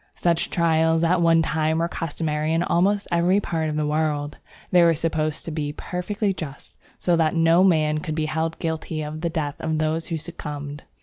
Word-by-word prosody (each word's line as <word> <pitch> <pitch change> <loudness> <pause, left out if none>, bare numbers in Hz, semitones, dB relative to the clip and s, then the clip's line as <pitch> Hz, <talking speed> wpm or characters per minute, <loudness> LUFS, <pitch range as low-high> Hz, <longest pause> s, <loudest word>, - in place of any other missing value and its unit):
Such 170 -2 +1
trials 160 -1 +2
at 170 +1 +3
one 165 -1 +4
time 160 0 0
were 165 +1 +1
customary 155 -2 -2
in 165 +1 +2
almost 200 +4 +1
every 175 +3 +3
part 165 -5 -2
of 150 - -3
the 155 0 0
world. 150 -1 -1 0.3
They 180 - +6
were 170 -1 +5
supposed 155 -1 -2
to 165 - -4
be 150 -2 -3
perfectly 195 +5 -2
just, 145 -6 -9 0.2
so 175 - +1
that 160 0 +2
no 165 +2 +5
man 155 -4 +3
could 155 -1 -4
be 155 -1 0
held 160 +1 -2
guilty 160 -1 -3
of 155 +1 -6
the 170 - 0
death 150 -2 -3
of 160 -1 0
those 155 +1 -1
who 165 - -2
succumbed. 145 -3 -7
160 Hz, 195 wpm, -23 LUFS, 155-170 Hz, 0.3 s, They